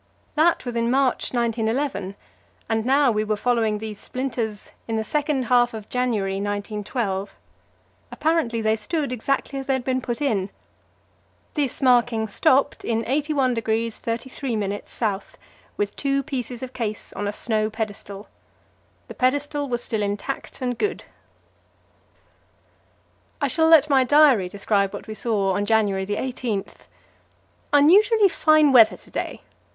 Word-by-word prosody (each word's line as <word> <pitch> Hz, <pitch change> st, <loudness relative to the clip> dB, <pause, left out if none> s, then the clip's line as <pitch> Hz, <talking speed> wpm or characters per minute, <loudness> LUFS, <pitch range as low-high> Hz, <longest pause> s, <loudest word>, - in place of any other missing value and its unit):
That 320 Hz, 0 st, +2 dB
was 245 Hz, -1 st, -4 dB
in 235 Hz, 0 st, +1 dB
March, 265 Hz, 0 st, +1 dB
1911, 230 Hz, -3 st, -1 dB, 0.5 s
and 225 Hz, 0 st, -1 dB
now 275 Hz, -1 st, +4 dB
we 215 Hz, -1 st, 0 dB
were 215 Hz, 0 st, 0 dB
following 225 Hz, -1 st, +1 dB
these 215 Hz, -1 st, -7 dB
splinters 235 Hz, -5 st, -4 dB, 0.2 s
in 225 Hz, -, -2 dB
the 220 Hz, -, 0 dB
second 290 Hz, +1 st, -1 dB
half 240 Hz, -1 st, +3 dB
of 215 Hz, -1 st, -9 dB
January, 220 Hz, -6 st, -1 dB
1912. 205 Hz, 0 st, -3 dB, 0.8 s
Apparently 310 Hz, -8 st, 0 dB
they 220 Hz, 0 st, +2 dB
stood 280 Hz, +6 st, -2 dB
exactly 275 Hz, +3 st, -2 dB
as 270 Hz, -, -7 dB
they 270 Hz, -, +2 dB
had 260 Hz, -1 st, -1 dB
been 260 Hz, 0 st, -1 dB
put 240 Hz, -1 st, -3 dB
in. 215 Hz, -10 st, 0 dB, 1.0 s
This 285 Hz, -3 st, -2 dB
marking 240 Hz, -3 st, +3 dB
stopped 260 Hz, +6 st, +2 dB
in 230 Hz, -1 st, -1 dB
81° 250 Hz, -5 st, 0 dB
33' 235 Hz, -1 st, -3 dB
S., 205 Hz, -1 st, -4 dB, 0.4 s
with 205 Hz, -1 st, -2 dB
two 275 Hz, -1 st, 0 dB
pieces 250 Hz, -4 st, -5 dB
of 260 Hz, 0 st, -7 dB
case 215 Hz, -3 st, -5 dB
on 205 Hz, -, -3 dB
a -, -, -1 dB
snow 215 Hz, 0 st, -1 dB
pedestal. 210 Hz, -2 st, -6 dB, 0.8 s
The -, -, -8 dB
pedestal 285 Hz, +2 st, 0 dB
was 240 Hz, -1 st, -2 dB
still 220 Hz, -2 st, -2 dB
intact 205 Hz, +7 st, -4 dB
and 245 Hz, -1 st, -2 dB
good. 420 Hz, -, -1 dB, 2.4 s
I 285 Hz, -, +1 dB
shall 320 Hz, +5 st, +2 dB
let 320 Hz, -2 st, +7 dB
my 270 Hz, -3 st, +4 dB
diary 265 Hz, -9 st, +5 dB
describe 200 Hz, 0 st, 0 dB
what -, -, -7 dB
we 215 Hz, -, -6 dB
saw 210 Hz, -4 st, 0 dB
on 205 Hz, +1 st, -1 dB
January 205 Hz, -4 st, +2 dB
18: 230 Hz, -2 st, -2 dB, 1.1 s
"Unusually 395 Hz, +9 st, +5 dB
fine 310 Hz, -3 st, +4 dB
weather 230 Hz, -4 st, +6 dB
to -, -, -19 dB
day. -, -, -4 dB
235 Hz, 140 wpm, -23 LUFS, 215-275 Hz, 2.4 s, let